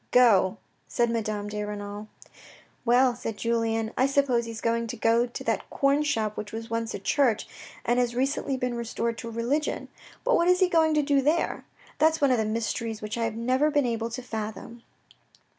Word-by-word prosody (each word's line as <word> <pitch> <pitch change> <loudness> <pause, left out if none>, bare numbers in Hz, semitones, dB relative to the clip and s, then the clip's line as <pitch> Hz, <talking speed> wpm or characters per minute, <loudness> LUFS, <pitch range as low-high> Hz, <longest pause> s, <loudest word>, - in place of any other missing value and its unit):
" - - -42
Go," 220 -5 +5 0.3
said 235 -1 +1
Madame 215 -2 -2
de 210 0 -3
Renal. 205 0 -6 0.4
" - - -24
Well," 250 +1 +4
said 225 -3 -5
Julien, 225 0 0
" - - -34
I 260 - +5
suppose 275 -4 +2
he's 230 -1 -6
going 230 0 0
to - - -5
go 230 +2 +3
to 240 - -7
that - - -1
corn 280 +1 +2
shop 220 -8 0
which 210 -1 -6
was 225 0 -7
once 230 0 -2
a - - -5
church, 260 -7 +1 0.4
and 240 +1 +2
has 240 -1 0
recently 270 +1 0
been 250 -1 -2
restored 235 0 -2
to 230 - -6
religion, 240 +7 -2 0.3
but - - +3
what 340 - +3
is 360 0 +4
he 370 -2 +4
going 320 -2 +3
to 300 - +3
do 280 -1 +3
there? 305 +5 0 0.3
That's 320 +1 +4
one 280 -2 +3
of 250 - +3
the 220 - +1
mysteries 225 0 -2
which 210 +1 -3
I 230 -1 0
have 225 -1 -3
never 255 +6 +2
been 290 -2 +2
able 230 -1 -1
to 245 +2 -6
fathom." 220 +1 -6
235 Hz, 210 wpm, -27 LUFS, 225-270 Hz, 0.4 s, Go